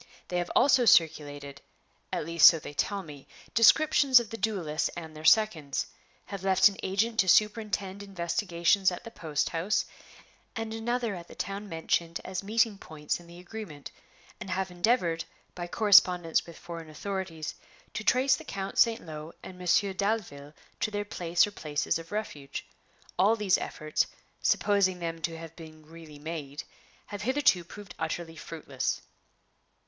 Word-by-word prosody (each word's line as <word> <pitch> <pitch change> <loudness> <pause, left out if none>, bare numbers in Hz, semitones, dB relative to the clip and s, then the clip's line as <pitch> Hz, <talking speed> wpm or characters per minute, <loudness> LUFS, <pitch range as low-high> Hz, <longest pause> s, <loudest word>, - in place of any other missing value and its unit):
They 180 - 0
have 175 - -3
also 265 -2 +5
circulated 145 -6 +2 0.5
at - - -2
least 170 +1 +7
so 165 - +7
they 145 - -9
tell 200 +6 -1
me 145 -4 -12 0.3
descriptions 270 +2 +6
of 235 -3 -7
the 225 - -5
duelists 180 -9 -1
and 160 -2 -8
their 155 - -10
seconds; 160 - +3 0.4
have 200 -2 -7
left 190 -1 +6
an 200 -1 -3
agent 220 +4 0
to 190 - +4
superintend 205 -2 +2
investigations 185 0 +1
at 180 - -7
the 230 - -9
post 155 -7 -2
house, 180 +6 0 0.7
and 225 0 -4
another 235 0 -1
at 175 -2 -8
the - - -13
town 200 +1 -5
mentioned 165 0 -1
as 185 -1 -3
meeting 215 0 +1
points 150 0 -4
in 175 - -16
the 170 0 -13
agreement; 180 -5 -9 0.5
and - - -7
have 185 0 -2
endeavored, 175 -3 +1 0.3
by 175 -1 -6
correspondence 180 -5 +4
with 170 - -11
foreign 165 -2 -8
authorities, 165 -1 -5 0.4
to 215 - -4
trace 260 +3 +4
the 320 - -10
Count 195 -8 -4
St. 230 -4 +3
Lo 155 0 -8
and 185 - -9
Monsieur 185 +2 +2
Dalville 185 -8 -3 0.2
to - - 0
their 205 -1 -3
place 175 -4 +1
or 205 - -8
places 150 -4 -2
of 165 0 -11
refuge. 150 -10 -5 0.5
All 205 +5 +5
these 210 -4 +2
efforts, 155 0 -1 0.3
supposing 200 -3 +2
them 165 -1 -5
to 165 +1 -3
have 165 0 -10
been 155 -2 -13
really 160 -1 -12
made, 150 -1 -6 0.4
have 205 0 -7
hitherto 255 -6 +2
proved 200 +3 -11
utterly 165 +1 -4
fruitless." 140 -5 -4
180 Hz, 160 wpm, -29 LUFS, 160-205 Hz, 0.7 s, least